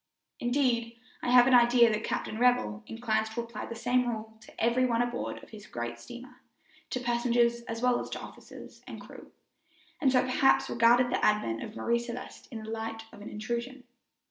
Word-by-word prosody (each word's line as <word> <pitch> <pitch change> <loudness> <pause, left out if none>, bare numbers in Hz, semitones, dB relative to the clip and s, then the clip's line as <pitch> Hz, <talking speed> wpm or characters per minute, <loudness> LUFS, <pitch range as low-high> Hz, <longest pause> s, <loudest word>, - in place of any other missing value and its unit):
Indeed, 240 -2 0 0.2
I - - -2
have 245 0 +7
an 260 - +3
idea 240 -1 +6
that 215 +1 -2
Captain 215 - -3
Revell 245 -4 +2
inclines 220 -1 -1
to 220 +2 -3
apply 235 -2 -7
the 230 - -6
same 245 +2 +1
rule 220 -1 -5
to - - -15
every 235 +3 +2
one 240 -1 +2
aboard 245 0 -4
of - - -14
his 215 -1 -11
great 120 0 -5
steamer, 250 - -11 0.5
to 255 - -2
passengers 235 -1 +1
as 230 +1 -5
well 250 -1 +3
as - - -6
to - - -5
officers - - -12
and - - -8
crew, - - -13 0.7
and 270 -3 +3
so 255 -1 +4
perhaps 255 +1 +3
regarded 240 +2 +4
the - - -1
advent 165 - +1
of 215 - -7
Marie 235 0 +1
Celeste 240 +1 -8
in 220 -2 -7
the 220 - -8
light 225 0 -4
of - - -12
an 205 - -8
intrusion. 235 +4 -4
235 Hz, 195 wpm, -29 LUFS, 225-245 Hz, 0.7 s, have